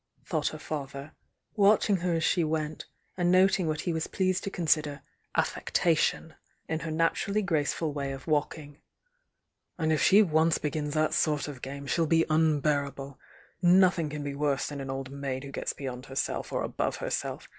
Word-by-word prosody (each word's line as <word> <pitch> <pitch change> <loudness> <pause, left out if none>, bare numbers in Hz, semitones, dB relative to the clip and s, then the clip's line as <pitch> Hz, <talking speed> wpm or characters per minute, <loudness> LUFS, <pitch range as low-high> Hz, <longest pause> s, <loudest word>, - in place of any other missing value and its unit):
thought - - -1
her - - -3
fa 145 -3 -4
ther, 140 +2 -9 0.4
watching 205 -1 +4
her 175 -1 0
as 165 - 0
she 175 - +2
went, 155 -1 -3 0.3
and 175 -1 +1
noting 185 -1 +4
what 155 0 -1
he 175 - -1
was 160 0 -2
pleased 185 -1 0
to - - -2
consider 155 -6 0 0.3
"affectation" 160 -1 +1 0.3
in 160 -1 -2
her 165 - -5
natur 165 +5 0
ally 215 - +2
graceful 160 -4 -1
way 140 -1 -3
of 135 -1 -7
walking. 150 -1 -2 1.0
"And 160 -2 +1
if 155 - +1
she 205 +3 +6
once 160 -2 +2
begins 150 0 -3
that 155 0 +2
sort 150 -2 +1
of 140 -4 -8
game, 140 +1 -6
she'll 165 +4 +1
be 165 +1 +3
unbearable! 145 -3 0 0.4
Noth 185 0 +5
ing 155 -2 -1
can 150 0 -5
be 145 -1 -4
worse 140 -1 0
than 145 -2 -6
an 135 - -6
old 135 0 -4
maid 135 -1 -4
who 140 - -8
gets - - -3
beyond 130 -2 -7
herself 135 0 -3
or - - -1
above - - -2
herself! - - -4
155 Hz, 185 wpm, -28 LUFS, 140-165 Hz, 1.0 s, she